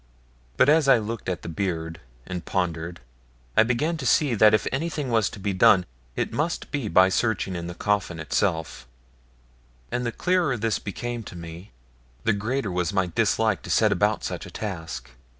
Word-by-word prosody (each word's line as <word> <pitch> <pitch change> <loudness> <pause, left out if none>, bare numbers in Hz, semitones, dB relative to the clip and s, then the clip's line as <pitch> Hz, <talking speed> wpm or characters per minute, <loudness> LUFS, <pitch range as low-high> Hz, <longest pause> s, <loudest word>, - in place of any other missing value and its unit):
But - - +5
as 150 -1 +4
I 135 - +7
looked 110 -1 -4
at 90 -4 -3
the - - -6
beard 80 -2 -3 0.3
and 90 -2 -5
pondered, 85 -4 -2 0.5
I - - +7
began 125 +9 +1
to 140 - -6
see 145 -1 +3
that 110 -1 +6
if 110 - +2
anything 150 -2 -2
was 110 -3 +3
to - - -10
be 100 0 -1
done, 95 0 +5 0.3
it - - -2
must 160 +3 -2
be 140 -7 -2
by 95 0 +5
searching 95 -2 0
in 85 -1 -4
the 90 - -6
coffin 100 -5 -1
itself, 80 -5 -1 1.0
and 120 +1 -1
the 120 - -1
clearer 175 -2 +1
this 110 -1 0
became 120 +4 -4
to - - -9
me, 85 +3 -9 0.5
the 115 - +3
greater 110 +1 -2
was 90 -2 0
my 95 -2 +1
dislike 110 -2 +2
to - - -10
set - - +3
about - - +1
such - - -4
a - - -9
task. 80 - -6
105 Hz, 185 wpm, -25 LUFS, 90-120 Hz, 1.0 s, I